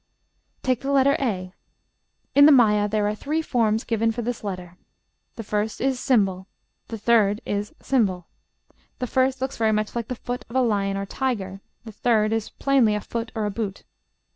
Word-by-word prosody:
Take 255 -3 +1
the 275 - -4
letter 280 0 +4
a. 185 -8 -2 0.8
In 285 +1 +8
the - - +8
Maya 210 -6 +4
there 210 0 +1
are 210 - 0
three 305 +9 -2
forms 225 -5 +1
given 225 -1 0
for 235 +1 -4
this 240 0 -4
letter. 180 -3 -6 0.6
The 225 - -6
first 210 +1 -2
is 260 -1 -1
###; - - -7
the 195 -1 -2
third 210 -2 +3
is 205 +1 -2
###. - - -37
The 190 -9 +1 0.8
first 260 +1 +1
looks 265 +1 -3
very 220 -1 +2
much 215 +1 -1
like 235 -2 -2
the 250 - -4
foot 245 +1 -5
of 235 - -10
a 260 - +4
lion 200 -4 0
or 195 - -3
tiger; 195 -5 -3 0.2
the 220 - -8
third 215 0 +1
is 225 -1 -2
plainly 260 -6 +2
a - - -1
foot 230 +1 -5
or 215 -2 -1
boot. 200 -2 -4
220 Hz, 185 wpm, -24 LUFS, 205-250 Hz, 0.8 s, In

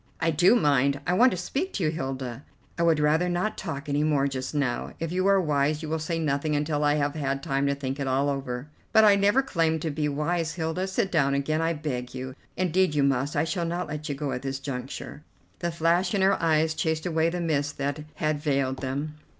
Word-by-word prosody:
"I 165 0 +2
do 175 +9 +5
mind. 140 - +3
I 175 - +1
want 245 +7 +6
to 185 - -3
speak 280 - -3
to 190 - -2
you, 155 - +2
Hilda." 135 -4 -4 0.3
"I - - -3
would 165 -2 +3
rather 155 +4 +2
not 180 +5 -1
talk 145 -6 -5
any 145 +1 +1
more 145 -3 +2
just 130 +1 -4
now. 135 -4 -1
If 165 0 -3
you 185 +2 +1
are 195 0 +5
wise 150 -2 +1
you 155 - -4
will 160 0 -1
say 165 +1 -2
nothing 150 -1 0
until 150 0 0
I 145 0 +3
have 145 -1 0
had 140 -2 -2
time 135 +1 0
to 140 - +1
think 135 0 -4
it 140 - -2
all 135 +2 +1
over." 135 -2 -3 0.3
"But 220 - +7
I 205 -2 +7
never 205 +7 +3
claimed 165 - 0
to 160 - -1
be 150 0 -1
wise, 160 +3 -1
Hilda. 165 +2 -2
Sit 195 0 -1
down 140 -4 +2
again, 155 +3 0
I 165 +1 +1
beg 145 -5 -3
of 125 - -13
you. 130 0 -6 0.2
Indeed 185 -2 +2
you 145 - +3
must, 140 +1 +1
I - - +2
shall 170 +2 -2
not 170 +1 -2
let 150 +1 -5
you 145 - -1
go 140 0 -3
at 125 - -3
this 135 0 -3
juncture." 135 +1 -6 0.4
The 175 -1 -1
flash 170 +4 +1
in 195 - +2
her 195 -1 +3
eyes 160 -1 +2
chased 160 0 -1
away 165 -1 +2
the 175 +1 -3
mist 145 -4 -1
that 140 +2 -2
had 155 -1 0
veiled 140 -3 0
them. 140 +3 -4
150 Hz, 240 wpm, -26 LUFS, 140-170 Hz, 0.4 s, But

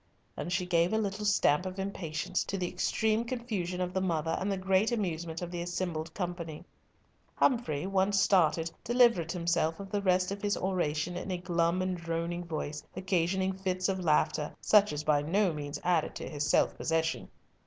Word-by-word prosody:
and 175 - -4
she 185 0 0
gave 170 -1 +2
a - - +3
little 210 -1 -2
stamp 180 -6 +3
of 185 0 -5
impatience, 185 -3 -2
to 195 - -3
the 180 -2 -1
extreme 220 +4 0
confusion 225 -8 -3
of 180 0 -2
the 190 - 0
mother 165 -3 0
and 195 +2 -1
the 195 - -1
great 190 +4 +2
amusement 170 -6 -2
of 175 - -5
the 175 -1 -3
assembled 175 -2 -3
company. 175 -3 -5 0.7
Humfrey, 185 - +1
once 195 +1 +2
started, 165 -4 +3
delivered 235 -9 +3
himself 170 -2 0
of 195 -1 -8
the 205 -1 0
rest 185 -1 +2
of 200 0 -4
his 205 0 0
oration 175 -3 -1
in 180 - -5
a 185 - -1
glum 175 0 +1
and 185 0 -1
droning 170 +1 -3
voice, 155 -2 -4
occasioning 190 +1 0
fits 185 -1 -1
of 190 -1 -1
laughter, 150 -3 +1
such 210 -1 +5
as 150 0 -3
by 145 -1 +3
no 180 +4 +1
means 145 -1 -5
added 175 -3 +1
to - - -5
his 145 -1 -2
self - - +3
possession. 165 0 -1
180 Hz, 185 wpm, -30 LUFS, 165-195 Hz, 0.7 s, such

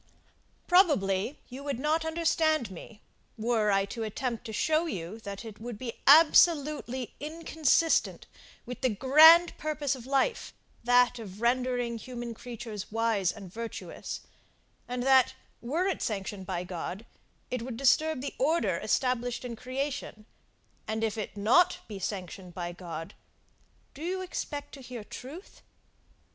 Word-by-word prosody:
Probably 275 - +3
you 260 +2 -9
would 280 -3 -2
not 305 +4 +1
understand 320 -6 +1
me, 205 +4 -11 0.3
were 220 -1 +1
I 195 -1 +3
to 230 +3 -7
attempt 230 +2 -3
to 220 - -6
show 315 +9 +1
you 185 - -5
that 200 0 -7
it 220 -1 -10
would 235 -2 -6
be 235 0 -5
absolutely 295 -4 +5
inconsistent 320 +1 +1 0.4
with 250 - -7
the 260 - +3
grand 310 - +7
purpose 295 -2 -1
of 250 -1 -11
life, 280 - 0 0.3
that 245 0 +4
of 200 -3 -9
rendering 245 -1 0
human 240 -1 -6
creatures 225 -3 -7
wise 225 -5 +1
and 195 -4 -11
virtuous: 230 0 -6 0.7
and 245 0 -3
that, 260 -1 +5 0.3
were 305 +10 -1
it 385 -3 -1
sanctioned 195 -2 -4
by 180 -2 -2
God, 180 +4 -6 0.5
it 250 -2 -2
would 235 -1 -6
disturb 275 +3 +3
the 280 - -4
order 315 +6 +2
established 250 -1 -1
in 240 -1 -5
creation; 255 -3 -4 0.6
and 220 0 -2
if 220 -2 0
it 215 -2 -5
be 200 - -6
not 350 - +4 0.2
sanctioned 185 -2 -6
by 175 -1 -4
God, 170 0 -7 0.8
do 285 - -12
you 370 +3 -2
expect 290 -5 -5
to 275 - -10
hear 245 -3 -8
truth? 285 - -10
245 Hz, 140 wpm, -29 LUFS, 215-290 Hz, 0.8 s, grand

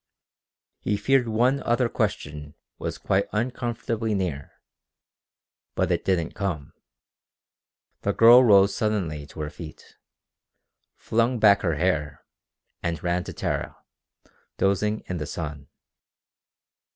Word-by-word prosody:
He 105 - -1
feared 135 +1 +2
one 125 +5 +2
other 120 +1 +1
question 75 - -3 0.2
was - - -4
quite 95 +1 0
uncomfortably 115 -1 -2
near. 80 -8 -3 1.2
But - - 0
it - - 0
didn't 85 -4 0
come. 85 -8 -4 1.3
The - - 0
girl 120 +3 +7
rose 100 -4 +5
suddenly 90 -10 -2
to 75 - -9
her 75 0 -4
feet, 80 -3 -12 1.0
flung 115 +2 0
back 105 -2 +5
her 85 -4 0
hair, 75 -4 -1 0.6
and 85 -1 -3
ran 90 0 0
to - - -7
Tara, - - -3 0.8
dozing 105 +2 +1
in 90 - -5
the 75 - -4
sun. 75 -4 -6
100 Hz, 115 wpm, -25 LUFS, 80-115 Hz, 1.3 s, girl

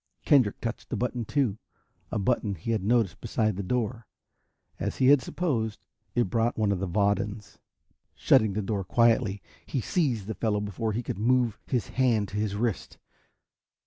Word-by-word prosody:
Kendrick 130 -9 +4
touched 115 0 -5
a - - 0
button 125 -1 -2
too, 115 -5 0 0.5
a - - -2
button 105 -1 0
he 90 +7 -4
had 110 -4 0
noticed 110 -4 +1
beside 110 -2 0
the 100 - -3
door. 115 +3 -2 0.7
As - - -3
he 130 - +4
had 145 -2 +6
supposed, 115 -13 -2 0.3
it 120 - +4
brought 115 +1 +1
one 105 -2 +2
of 95 - 0
the 95 - -2
Vadans. 100 +2 -1 0.6
Shutting 110 -3 +4
the 105 +1 -2
door 100 0 -2
quietly, 115 0 +2 0.2
he 135 - -3
seized 125 - 0
the 110 - -3
fellow 105 -1 0
before 105 +2 -2
he 120 +4 -2
could 100 - -4
move 120 0 +2
his 125 -4 -1
hand 115 -6 +1
to 100 - -5
his 105 -1 -1
wrist. 115 -1 -2
110 Hz, 175 wpm, -27 LUFS, 100-120 Hz, 0.7 s, had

